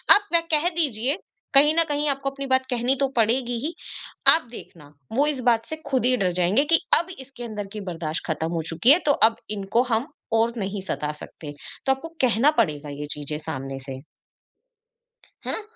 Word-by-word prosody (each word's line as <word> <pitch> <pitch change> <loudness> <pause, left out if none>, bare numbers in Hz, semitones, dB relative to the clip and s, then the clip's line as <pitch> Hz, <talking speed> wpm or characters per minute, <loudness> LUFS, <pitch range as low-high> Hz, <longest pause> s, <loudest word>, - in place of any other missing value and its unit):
अब 410 0 0
वह 335 - +5
कह 310 +3 +4
दीजिए 275 - +1 0.4
कहीं 290 +2 +6
न - - +5
कहीं 295 +1 0
आपको 275 0 -2
अपनी 275 0 -7
बात 260 0 +2
कहनी 245 +1 +1
तो 275 - +2
पड़ेगी 240 +2 +1
ही, 330 - -3 0.6
आप 320 -6 -3
देखना, 150 -10 -11 0.2
वो 275 +5 +3
इस 295 -3 -1
बात 230 -1 +1
से 315 - -4
खुद 260 -3 0
ही 255 0 +4
डर 190 -5 0
जाएँगे 180 +10 +2
कि 330 +1 +4 0.2
अब 340 - -4
इसके 265 -2 -10
अंदर 210 -3 -5
की 210 - -6
बर्दाश्त 165 -2 -4
ख़त्म 160 0 -2
हो 165 - -1
चुकी 175 +10 +2
है, 320 - +6
तो 295 - +4
अब 225 -5 +4 0.2
इनको 200 +4 +1
हम 225 +5 0 0.3
और 225 +1 +2
नहीं 200 -1 -3
सता 150 0 -2
सकते, 150 0 -10 0.3
तो 270 - +3
आपको 330 +5 -4
कहना 255 +3 +3
पड़ेगा 150 -7 -3
ये 145 +1 -6
चीज़ें 150 +1 -3
सामने 135 -2 -6
से। 130 0 -7 1.4
है - - -3
ना? 440 - -3
235 Hz, 200 wpm, -24 LUFS, 175-275 Hz, 1.4 s, कहीं